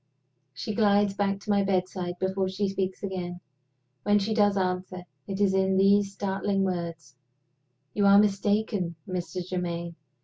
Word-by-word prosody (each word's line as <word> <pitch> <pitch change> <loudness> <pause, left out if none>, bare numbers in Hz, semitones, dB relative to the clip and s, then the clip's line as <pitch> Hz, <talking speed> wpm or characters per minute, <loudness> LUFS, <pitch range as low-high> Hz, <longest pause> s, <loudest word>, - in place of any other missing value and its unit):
She 210 +11 -4
glides 205 -2 +3
back 200 0 -1
to 210 - -3
my 200 0 +3
bedside 185 -2 -1
before 190 +1 -1
she 195 +2 -1
speaks 190 -1 -3
again. 180 -2 -4 0.6
When 205 +5 +3
she 205 +2 0
does 205 -2 +3
answer, 185 -1 -2 0.2
it 195 0 -4
is 200 -2 +3
in 190 0 +2
these 200 +1 +4
startling 195 0 -1
words: 170 -7 -4 0.8
"You 205 - +1
were 200 0 +7
mistaken, 205 -3 +1
Mr. 180 -1 -4
Germaine. 170 -2 -3
190 Hz, 145 wpm, -27 LUFS, 180-200 Hz, 0.8 s, were